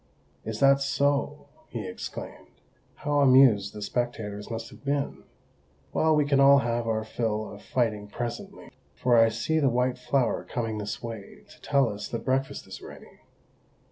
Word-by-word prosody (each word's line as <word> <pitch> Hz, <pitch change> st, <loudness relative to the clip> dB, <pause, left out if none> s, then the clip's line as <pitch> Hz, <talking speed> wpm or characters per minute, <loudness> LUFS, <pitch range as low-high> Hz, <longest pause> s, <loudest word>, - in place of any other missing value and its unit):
"Is 110 Hz, 0 st, -5 dB
that 140 Hz, 0 st, +5 dB
so?" 140 Hz, +1 st, 0 dB, 0.2 s
he -, -, -5 dB
exclaimed. -, -, -7 dB, 0.5 s
"How 145 Hz, -1 st, 0 dB
amused 130 Hz, -7 st, +5 dB
the 105 Hz, -, -5 dB
spectators 105 Hz, -2 st, -3 dB
must 115 Hz, 0 st, -5 dB
have -, -, -15 dB
been! 140 Hz, 0 st, -2 dB, 0.7 s
Well, 160 Hz, 0 st, +3 dB
we 150 Hz, -1 st, +3 dB
can 140 Hz, -1 st, +2 dB
all 140 Hz, 0 st, +8 dB
have 120 Hz, -3 st, 0 dB
our 110 Hz, -1 st, 0 dB
fill 110 Hz, -1 st, -2 dB
of 100 Hz, -, -11 dB
fighting 110 Hz, -5 st, -1 dB
presently, 120 Hz, +2 st, -6 dB, 0.2 s
for 125 Hz, -1 st, +2 dB
I 115 Hz, -1 st, +6 dB
see 115 Hz, +8 st, 0 dB
the 140 Hz, -3 st, +3 dB
White 125 Hz, +1 st, 0 dB
Flower 135 Hz, -3 st, 0 dB
coming 115 Hz, -3 st, -3 dB
this 105 Hz, +2 st, -5 dB
way 115 Hz, -4 st, -8 dB
to -, -, -18 dB
tell 140 Hz, -3 st, +2 dB
us 105 Hz, -1 st, -5 dB
that 115 Hz, -, -5 dB
breakfast 135 Hz, +1 st, -1 dB
is -, -, -10 dB
ready. -, -, -13 dB
120 Hz, 165 wpm, -27 LUFS, 110-140 Hz, 0.7 s, all